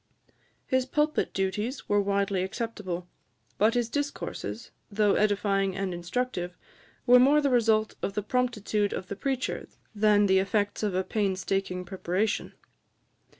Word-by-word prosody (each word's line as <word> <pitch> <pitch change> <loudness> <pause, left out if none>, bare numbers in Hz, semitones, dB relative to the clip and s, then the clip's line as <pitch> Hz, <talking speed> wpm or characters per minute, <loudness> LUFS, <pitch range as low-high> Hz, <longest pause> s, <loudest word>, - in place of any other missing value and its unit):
His 260 0 +1
pulpit 300 +3 +1
duties 210 +7 -2
were 205 0 +3
widely 200 -1 0
acceptable; 190 -3 -4 0.5
but 220 +3 +4
his 240 -2 +1
discourses, 285 +4 -4 0.2
though 210 -1 +2
edifying 195 -2 +1
and 195 -2 -2
instructive, 175 0 -3 0.5
were 250 0 +8
more 280 +4 +6
the 285 -2 +1
result 220 -3 +3
of 195 - -2
the 210 - -2
promptitude 215 -3 0
of 185 - -5
the 200 - -3
preacher 260 +3 -2 0.3
than 210 -1 +4
the 190 -1 +4
effects 205 +1 0
of 205 -4 -1
a 185 - +1
painstaking 190 -2 -1
preparation. 190 +3 -2
205 Hz, 135 wpm, -28 LUFS, 190-235 Hz, 0.5 s, were